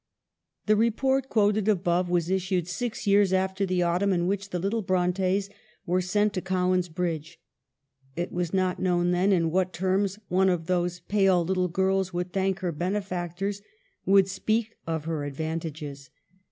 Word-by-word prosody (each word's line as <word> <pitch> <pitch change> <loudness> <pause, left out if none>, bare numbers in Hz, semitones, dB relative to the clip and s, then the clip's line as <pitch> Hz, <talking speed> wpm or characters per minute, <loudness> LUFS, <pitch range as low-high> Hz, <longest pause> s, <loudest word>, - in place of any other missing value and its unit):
The 215 - +4
report 265 +5 +1
quoted 210 -1 +2
above 180 -3 +1
was 175 0 0
issued 185 -2 0
six 230 +6 -4
years 200 -1 +4
after 190 +1 0
the 180 -1 +1
autumn 180 +4 +1
in 175 -1 0
which 200 +1 -2
the 180 - -2
little 200 +6 -1
Brontes 185 +1 +1 0.4
were 180 0 +1
sent 205 +3 +1
to 185 - -2
Cowan's 185 -1 0
Bridge; 165 -1 -4 0.8
it 175 +1 -3
was 175 -2 -2
not 185 -1 0
known 175 -1 +2
then 180 +3 +2
in 165 -4 +2
what 185 +1 0
terms 190 +2 0
one 190 +1 +3
of 175 -3 -1
those 180 0 -1
pale 195 -4 +2
little 185 0 +1
girls 190 +1 0
would 180 +1 -3
thank 195 0 0
her 180 -2 -1
benefactors, 185 +2 -3 0.4
would 195 0 +5
speak 215 +4 -1
of 160 -2 -2
her 160 -3 -2
ad 145 -1 -5
vantages. 155 -3 -5
185 Hz, 165 wpm, -26 LUFS, 175-195 Hz, 0.8 s, would